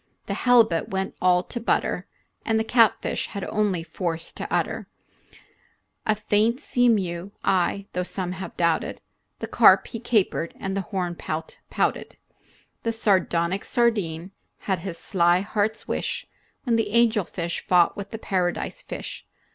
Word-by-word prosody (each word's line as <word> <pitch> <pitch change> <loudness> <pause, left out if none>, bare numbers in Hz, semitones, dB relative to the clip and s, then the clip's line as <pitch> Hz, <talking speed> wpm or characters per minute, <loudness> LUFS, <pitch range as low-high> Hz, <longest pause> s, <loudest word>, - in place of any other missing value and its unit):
The - - -3
halibut 230 -9 +3
went 190 0 -2
all 180 0 +4
to 240 - -5
butter, 230 - 0 0.4
And 220 -1 +1
the - - +1
catfish 230 -1 +2
had 200 - -6
only 200 -6 0
force 165 0 -4
to - - -7
utter 215 +4 -1 1.2
A 215 - +3
faint 215 +3 +1
sea 245 -4 +2
mew 190 -3 -1
aye, 195 +1 +1
though 180 - 0
some 180 0 -3
have 185 +1 -7
doubted, 170 -2 +1 0.4
The - - -3
carp - - +6
he 230 - -6
capered 210 -7 0
and 195 0 -3
the 195 - 0
horn 180 -4 -2
pout 160 -1 -5
pouted. - - -1 0.6
The 230 - 0
sardonic 190 -4 +1
sardine 195 -8 0 0.3
had 190 -3 -1
his 170 -1 -6
sly 175 -2 +2
heart's 215 +2 -1
wish - - -2 0.4
When 235 -4 +2
the 220 -2 0
angelfish 210 -7 +1
fought 175 -2 +4
with 200 0 -6
the 225 - -5
paradise 180 -5 -2
fish. - - -7
195 Hz, 145 wpm, -25 LUFS, 175-220 Hz, 1.2 s, carp